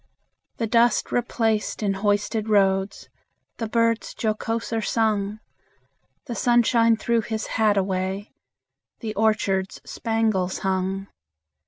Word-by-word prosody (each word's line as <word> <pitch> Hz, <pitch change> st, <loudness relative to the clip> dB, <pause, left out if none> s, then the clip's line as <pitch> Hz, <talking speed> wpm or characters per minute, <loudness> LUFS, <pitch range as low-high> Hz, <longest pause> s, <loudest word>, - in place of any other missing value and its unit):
The 230 Hz, -, -1 dB
dust 235 Hz, +2 st, +2 dB
replaced 225 Hz, -3 st, 0 dB
in 200 Hz, -1 st, +1 dB
hoisted 205 Hz, +2 st, 0 dB
roads, 195 Hz, -1 st, +1 dB, 0.5 s
The 225 Hz, -, -3 dB
birds 230 Hz, 0 st, +1 dB
jocoser 225 Hz, +1 st, -2 dB
sung; 215 Hz, -2 st, 0 dB, 0.9 s
The 245 Hz, -, -5 dB
sunshine 235 Hz, -1 st, +3 dB
threw 235 Hz, 0 st, +1 dB
his 220 Hz, 0 st, -4 dB
hat 215 Hz, -2 st, +2 dB
away, 190 Hz, +1 st, -2 dB, 0.7 s
The 220 Hz, -3 st, -4 dB
orchards 200 Hz, -3 st, 0 dB
spangles 220 Hz, -5 st, 0 dB
hung. 190 Hz, 0 st, -1 dB
215 Hz, 105 wpm, -24 LUFS, 195-230 Hz, 0.9 s, sunshine